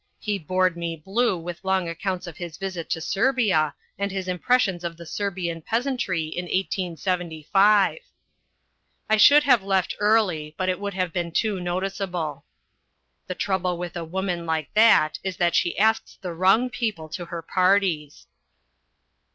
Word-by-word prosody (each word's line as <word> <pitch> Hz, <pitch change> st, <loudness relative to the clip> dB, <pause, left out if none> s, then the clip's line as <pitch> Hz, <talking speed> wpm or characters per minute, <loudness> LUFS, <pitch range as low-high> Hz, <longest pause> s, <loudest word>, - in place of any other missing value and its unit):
He 205 Hz, -2 st, -2 dB
bored 185 Hz, +2 st, +1 dB
me 170 Hz, -1 st, -3 dB
blue 195 Hz, +6 st, 0 dB
with 170 Hz, +1 st, -7 dB
long 190 Hz, -2 st, +1 dB
accounts 185 Hz, +2 st, -3 dB
of 170 Hz, -3 st, -9 dB
his 170 Hz, -3 st, -7 dB
visit 185 Hz, -4 st, -5 dB
to 165 Hz, -, -1 dB
Serbia 195 Hz, -, +1 dB, 0.2 s
and 200 Hz, 0 st, 0 dB
his 190 Hz, -1 st, -4 dB
impressions 185 Hz, 0 st, +1 dB
of 170 Hz, -1 st, -4 dB
the 170 Hz, -, -10 dB
Serbian 175 Hz, -2 st, -3 dB
peasantry 230 Hz, -, -1 dB
in 165 Hz, +3 st, -5 dB
1875. 185 Hz, -, +1 dB, 1.1 s
I 220 Hz, -, +3 dB
should 290 Hz, +7 st, +7 dB
have 250 Hz, -6 st, +5 dB
left 190 Hz, -1 st, 0 dB
early, 190 Hz, -8 st, +1 dB
but 185 Hz, 0 st, 0 dB
it 185 Hz, -, -1 dB
would 200 Hz, -1 st, -4 dB
have 185 Hz, -3 st, -1 dB
been 170 Hz, -1 st, -2 dB
too 205 Hz, +2 st, 0 dB
noticeable. 180 Hz, -3 st, -3 dB, 0.8 s
The 185 Hz, -, -4 dB
trouble 185 Hz, -2 st, -1 dB
with 175 Hz, 0 st, -6 dB
a 170 Hz, -, -3 dB
woman 175 Hz, 0 st, -3 dB
like 160 Hz, -2 st, -2 dB
that 215 Hz, -8 st, +5 dB
is 190 Hz, -1 st, -4 dB
that 175 Hz, -1 st, +2 dB
she 175 Hz, -, +1 dB
asks 220 Hz, +2 st, +1 dB
the 180 Hz, -2 st, -5 dB
wrong 195 Hz, +9 st, +3 dB
people 210 Hz, -11 st, -3 dB
to 175 Hz, +2 st, -6 dB
her 170 Hz, -1 st, -6 dB
parties. 180 Hz, -5 st, +1 dB
185 Hz, 155 wpm, -24 LUFS, 170-200 Hz, 1.1 s, should